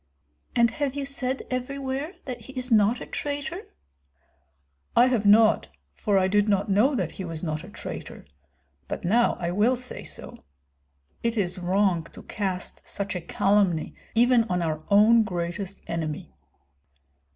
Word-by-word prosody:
"And 235 -2 +4
have 280 +2 -2
you 285 -1 -2
said 270 -1 -2
everywhere 275 +5 -3
that 245 -4 -6
he 265 - -11
is 255 -1 -3
not 220 +2 +4
a - - -5
traitor?" 295 +6 -4 1.3
"I 240 - +7
have 240 -5 +1
not, 215 +1 +5 0.3
for 200 - +1
I 185 -1 +3
did 205 +2 +2
not 200 +1 +1
know 240 +9 +4
that 185 -8 -1
he 190 - -7
was 165 -2 -5
not 155 -1 -2
a 185 - -10
traitor; - - -8 0.6
but - - -5
now 235 +7 +3
I 170 0 -1
will 215 +7 +3
say 250 0 -3
so. - - -8 0.8
It 230 0 -1
is 185 -2 -1
wrong 180 -2 +1
to - - -11
cast 190 -3 -4
such 200 -1 -3
a 180 - -3
calumny 195 -3 +1 0.2
even 240 0 +5
on 180 -4 -1
our 155 -1 -2
own 215 +3 +6
greatest 190 0 -4
enemy." 160 -3 -4
210 Hz, 155 wpm, -26 LUFS, 185-250 Hz, 1.3 s, I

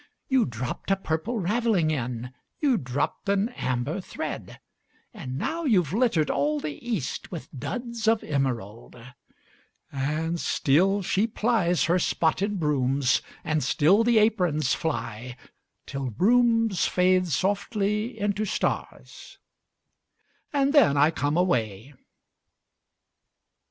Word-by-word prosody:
You 260 -3 +3
dropped 120 - -5
a 195 - +4
purple 195 +5 -3
ravelling 205 -4 +1
in, 125 -3 -4 0.3
You 275 -6 +2
dropped 130 +8 -3
an 200 +3 +2
amber 130 - -3
thread; - - -6 0.5
And 135 - -6
now 330 - -2
you 210 -10 +4
've 160 - -8
littered 215 - +2
all 150 +2 0
the 150 -1 -5
East 220 - -3
With 170 - -7
duds 235 - -4
of 225 0 +3
emerald! 120 -7 -3 1.0
And 155 +5 -2
still 190 +10 +2
she 200 +4 +1
plies 210 -6 +1
her 175 +3 +2
spotted 190 +5 0
brooms, 135 -3 +1 0.2
And 155 -2 0
still 160 - +3
the 235 0 +3
aprons 180 - +2
fly, 120 -5 -4 0.5
Till 135 -2 -4
brooms 225 - +3
fade 185 0 +2
softly 205 - -1
into 205 +1 0
stars 215 - -4 1.1
And 280 -1 +1
then 265 - +5
I 145 +3 +5
come 145 -1 -1
away. 120 - -1
175 Hz, 115 wpm, -26 LUFS, 140-215 Hz, 1.1 s, then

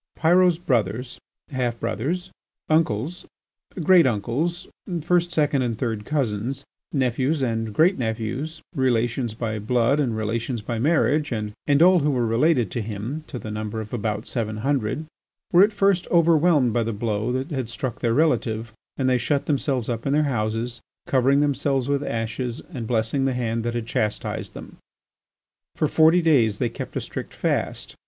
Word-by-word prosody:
Pyrot's 175 +1 +4
brothers, 120 - -1 0.3
half 125 -3 -1
brothers, 170 +11 -2 0.4
uncles, 155 - 0 0.6
great 175 -2 +6
uncles, 130 - -1 0.3
first, 175 +2 +1
second, 145 -4 +2
and 120 -3 -1
third 110 -4 -3
cousins, 130 -2 -2 0.3
nephews 135 +2 0
and 115 -2 -1
great 165 - +3
nephews, 120 +8 -3
relations 120 -2 0
by 110 -2 -3
blood 120 +5 +2
and 120 -6 0
relations 115 +3 -2
by 115 +1 -3
marriage, 150 +1 +2
and 105 -3 -3 0.3
all 180 0 +6
who 150 0 +1
were 125 -4 +1
related 120 - +2
to 120 - -2
him 110 +8 -5
to - - -6
the 110 -3 -6
number 110 +1 -4
of 110 +1 -7
about 110 -2 -2
seven 110 -3 -3
hundred, 140 +1 0 0.5
were 175 - +7
at 210 - +3
first 195 -3 +2
overwhelmed 165 -6 +4
by 120 - +2
the 115 0 -1
blow 110 +1 -1
that 130 +5 -3
had 130 -5 -3
struck 120 0 -4
their 115 -1 +1
relative, 115 -8 +1 0.2
and 130 - 0
they 125 -1 +3
shut 140 +4 0
themselves 135 -4 0
up 115 +1 -3
in 135 - +1
their 150 +1 +3
houses, 115 -2 -2 0.2
covering 135 +2 +3
themselves 140 -2 0
with 140 0 +1
ashes 115 -1 -3
and 120 -5 -5
blessing 120 +4 0
the 135 - +1
hand 115 -2 -1
that 120 0 -2
had 120 -1 -2
chastised 105 -2 -2
them. - - -10 1.0
For - - +1
forty 165 +2 +4
days 120 -10 +3
they 120 0 0
kept 115 - -7
a - - -1
strict - - -7
fast. - - -2
125 Hz, 165 wpm, -24 LUFS, 115-150 Hz, 1.0 s, were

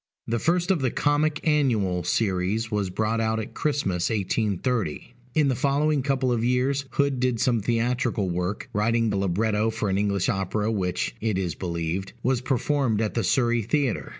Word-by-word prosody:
The 115 +1 -1
first 175 - +1
of 175 -6 +1
the 130 - +2
Comic 150 +4 0
Annual 110 - +2
series 105 +2 0
was 105 -3 0
brought 110 +4 0
out 110 0 0
at 110 - -6
Christmas, 120 - 0
1830. 110 - -1 0.2
In 155 -2 +4
the 135 - +2
following 145 +2 +1
couple 130 -1 0
of 115 -2 0
years, 130 +3 +1
Hood 140 -2 +1
did 125 -2 +1
some 125 -2 +2
theatrical 115 -1 0
work; 90 +3 -2
writing 115 +1 +1
the 100 - 0
libretto 105 +3 +1
for 110 -2 -2
an 95 - +1
English 100 -2 0
opera 105 0 0
which 90 -4 -1
(it 110 -3 0
is 90 -4 -1
believed) 85 +2 -3
was 125 -1 +1
performed 130 -3 0
at 110 -1 -1
the 115 - 0
Surrey 120 +4 +2
Theatre. 130 +2 -1
115 Hz, 175 wpm, -25 LUFS, 100-130 Hz, 0.2 s, In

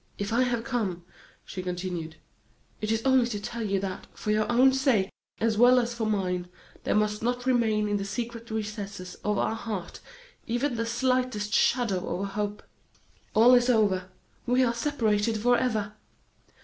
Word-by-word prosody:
"If 200 +2 -3
I 240 - +3
have 240 -2 0
come," 210 -9 -2 0.4
she 185 - -6
continued, 180 -3 -4 0.7
"it 215 0 -1
is 225 0 0
only 260 -2 +4
to 215 -4 -3
tell 230 +3 -5
you 200 -3 0
that, 190 -1 -5
for 210 - -2
your 215 +2 +1
own 260 +2 +5
sake, 260 -8 +2 0.3
as 220 -1 +1
well 250 +1 +7
as 240 0 -1
for 230 -2 -2
mine, 180 -4 -1 0.4
there - - +1
must 210 0 +1
not 245 +2 -1
remain 225 -4 +2
in 205 0 0
the 200 - -3
secret 230 +3 -5
recesses 205 -4 -5
of 210 0 +1
your - - +1
heart 215 -6 -5 0.5
even 245 +4 0
the 230 -1 -2
slightest 250 -3 0
shadow 230 -8 +2
of 180 - -3
a - - -1
hope. 205 0 -3 0.7
All 235 +4 +7
is 245 0 +5
over; 200 -6 +2 0.4
we 250 +2 +4
are 235 -2 +2
separated 230 -4 0
forever! 220 -3 +1
220 Hz, 170 wpm, -27 LUFS, 205-240 Hz, 0.7 s, well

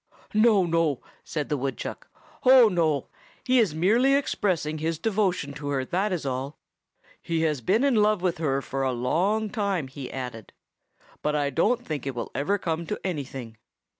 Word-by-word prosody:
"No, 215 -3 +5
no," 165 -5 +1 0.2
said 150 -2 -4
the 150 - 0
woodchuck. 135 +1 -4 0.4
"Oh, 255 -3 +8
no. 160 -7 0 0.3
He 255 0 +3
is 195 -10 +2
merely 230 +11 +4
expressing 175 - 0
his 160 +1 -1
devotion 185 -7 0
to 145 0 -7
her, 135 -2 -1
that 190 +8 0
is 175 -6 -2
all. 135 +2 -3 0.6
He 165 -1 -1
has 155 -5 0
been 210 - +2
in 280 -2 +3
love 210 -2 +3
with 180 -2 0
her 140 -4 0
for 135 - -3
a 130 -1 +1
long 195 - 0
time," 200 - -1
he 135 -1 -8
added, 125 -5 -7 0.7
"but 150 0 0
I 145 -1 0
don't 230 - +1
think 145 -4 -4
it 135 - -3
will 115 - -4
ever 180 +9 0
come 165 -3 -3
to 210 - -3
anything. 135 -9 -5
165 Hz, 175 wpm, -26 LUFS, 140-205 Hz, 0.7 s, Oh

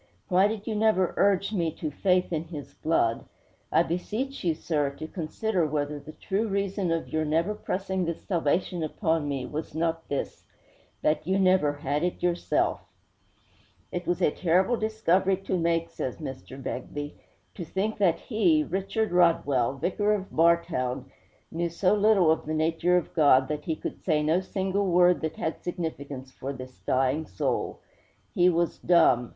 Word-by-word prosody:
Why 185 +2 +5
did 215 -1 -4
you 225 - -2
never 210 -4 +2
urge 200 +1 +2
me 170 -5 +1
to 155 -2 -4
faith 180 +3 +1
in 160 0 -1
His 155 -4 -8
blood? 115 -8 0 0.5
I 165 - +4
beseech 215 +11 -3
you, 165 -3 +1
sir, 150 -3 0
to - - -5
consider 175 +2 -1
whether 145 0 -2
the 155 +2 -11
true 205 +3 -2
reason 195 -2 -1
of 165 -1 -2
your 155 0 0
never 165 +6 +1
pressing 190 -2 -2
this 170 -1 -4
salvation 175 0 0
upon 160 -1 -1
me 135 -3 -2
was 150 +3 -6
not 165 0 -1
this 140 - -3 0.6
that 155 +1 +1
you 190 +1 +2
never 185 -6 +3
had 145 0 -2
it 180 0 -2
yourself!' 175 -1 +1 1.1
'It 175 0 -4
was 175 - 0
a - - +4
terrible 185 +9 +2
discovery 195 -4 +1
to 195 0 -3
make,' 165 -1 0
says 130 - -4
Mr. 135 -3 -8
Begbie. 145 +3 -5 0.4
'To 180 - -6
think 200 +6 -2
that 180 -5 +3
he 305 +7 +2
Richard 205 -1 -2
Rodwell, 145 -8 +3
Vicar 205 +9 +1
of 195 -2 -6
Bartown 160 -6 +1 0.4
knew 170 +1 -1
so 185 +3 +2
little 205 -5 +4
of 160 - -1
the 155 - -1
nature 165 +3 +2
of 175 - -3
God 140 -5 +5
that 150 -1 -3
he 160 - -1
could - - -7
say 155 -4 +2
no 160 +4 +3
single 190 +1 -1
word 180 0 +4
that 160 -1 -3
had 160 - -3
significance 145 -7 -5
for 135 +1 -6
this 130 -1 -10
dying 135 +4 +1
soul! 90 - -2 0.5
He 180 +1 +4
was 170 -1 0
dumb. 145 -9 +4
170 Hz, 170 wpm, -27 LUFS, 150-190 Hz, 1.1 s, Why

